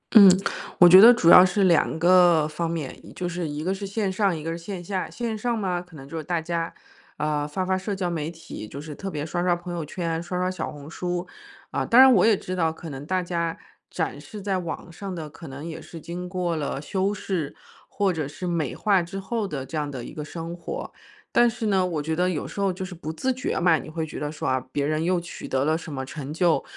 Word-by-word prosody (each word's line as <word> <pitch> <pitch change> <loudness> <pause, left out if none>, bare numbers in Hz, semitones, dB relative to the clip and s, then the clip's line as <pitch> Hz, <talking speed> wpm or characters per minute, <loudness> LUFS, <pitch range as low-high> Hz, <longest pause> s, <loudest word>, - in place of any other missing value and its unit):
嗯， 200 -3 +11 0.5
我 175 - +9
觉 185 +3 +10
得 235 +2 +11
主 180 -9 +4
要 180 - +11
是 195 +2 +2
两 170 -3 +3
个 175 -2 +5
方 165 +2 -3
面， 160 -5 -4 0.2
就 180 - -3
是 175 -1 -3
一 150 +1 -4
个 190 +2 0
是 195 0 -5
线 200 -1 -1
上， 195 -2 +1
一 155 - -7
个 165 - -3
是 165 - -3
线 175 0 -6
下。 185 0 -3
线 235 -2 -3
上 235 +2 -1
嘛， 180 -4 -1
可 175 -3 -16
能 135 -1 -10
就 165 - -9
是 160 - -3
大 170 +2 -1
家， 165 0 -2 0.5
呃， 150 -1 -1
发 185 +5 -2
发 190 0 +1
社 195 +2 -3
交 180 -2 -2
媒 160 -1 -2
体， 160 -10 -9
就 140 - -8
是 150 0 -7
特 195 +6 -5
别 150 -3 -4
刷 175 +2 -2
刷 175 -1 +3
朋 175 0 -7
友 170 -2 -3
圈、 165 +1 -3
刷 180 +1 -4
刷 180 0 0
小 185 - -4
红 145 -1 -10
书。 175 +2 -3 0.5
啊， - - 0
当 240 - +5
然 265 -1 +9
我 185 - +5
也 220 -3 +5
知 185 - -5
道， 165 -3 +1
可 160 -1 -9
能 135 +1 -7
大 185 -1 0
家 170 -1 -2 0.3
展 - - -3
示 210 - -9
在 195 -2 -1
网 170 0 -6
上 190 +1 -6
的 160 -2 -5
可 160 +2 -11
能 140 +4 -8
也 165 - -6
是 165 - -10
经 175 +3 -6
过 180 -3 -1
了 145 -2 -2
修 190 +6 -1
饰， 185 -7 -3 0.3
或 195 -3 +1
者 155 -4 -2
是 170 +5 -7
美 170 -6 -1
化 200 -4 +3
之 195 +3 -6
后 210 +1 -2
的 135 -5 -4
这 160 - -8
样 150 -1 -1
的 125 -4 -6
一 - - -9
个 150 - -5
生 165 +2 -6
活。 480 - -6 0.4
但 240 0 +6
是 225 0 -4
呢， 195 -3 +3
我 170 -4 -1
觉 160 +1 -1
得 180 +2 +2
有 160 - -2
时 200 - -5
候 195 -1 +2
就 185 +1 -5
是 185 - -8
不 160 -2 -6
自 260 +11 -1
觉 255 - -2
嘛， 170 -2 +4
你 - - -9
会 160 0 -3
觉 155 - -7
得 150 0 -3
说， 155 - -4
啊， 130 -1 +1
别 140 -1 0
人 155 +1 0
又 180 0 +2
取 170 - -8
得 135 +1 0
了 155 +1 +2
什 165 -1 -6
么 130 -1 -4
成 140 0 -7
就， 170 +1 +2
175 Hz, 280 characters per minute, -25 LUFS, 155-190 Hz, 0.5 s, 嗯